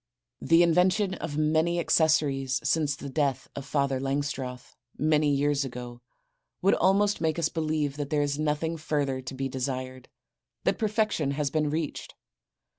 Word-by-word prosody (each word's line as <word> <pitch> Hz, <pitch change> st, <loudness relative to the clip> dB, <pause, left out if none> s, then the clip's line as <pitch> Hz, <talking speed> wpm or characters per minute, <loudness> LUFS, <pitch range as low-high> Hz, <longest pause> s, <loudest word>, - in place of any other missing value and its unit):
The 165 Hz, +1 st, +5 dB
invention 185 Hz, +4 st, +3 dB
of 145 Hz, -5 st, -5 dB
many 160 Hz, +3 st, +2 dB
accessories 145 Hz, -5 st, +2 dB
since 150 Hz, 0 st, +1 dB
the 140 Hz, -, -8 dB
death 135 Hz, -2 st, -1 dB
of 140 Hz, -1 st, -7 dB
Father 140 Hz, -2 st, 0 dB
Langstroth, 135 Hz, -2 st, -3 dB, 0.2 s
many 155 Hz, -1 st, +2 dB
years 145 Hz, 0 st, +1 dB
ago, 125 Hz, -2 st, -7 dB, 0.6 s
would 195 Hz, -, +3 dB
almost 200 Hz, +3 st, +2 dB
make 160 Hz, -1 st, 0 dB
us 165 Hz, -2 st, +1 dB
believe 155 Hz, -3 st, -1 dB
that 145 Hz, -2 st, -4 dB
there 150 Hz, 0 st, +1 dB
is 145 Hz, 0 st, -2 dB
nothing 155 Hz, +2 st, -1 dB
further 145 Hz, -4 st, -1 dB
to 130 Hz, +1 st, -7 dB
be 135 Hz, +1 st, -2 dB
desired, 130 Hz, -1 st, -4 dB, 0.5 s
that -, -, +1 dB
perfection 215 Hz, -, 0 dB
has 145 Hz, -2 st, 0 dB
been 155 Hz, -2 st, +1 dB
reached. 155 Hz, 0 st, -4 dB
150 Hz, 150 wpm, -27 LUFS, 135-160 Hz, 0.6 s, The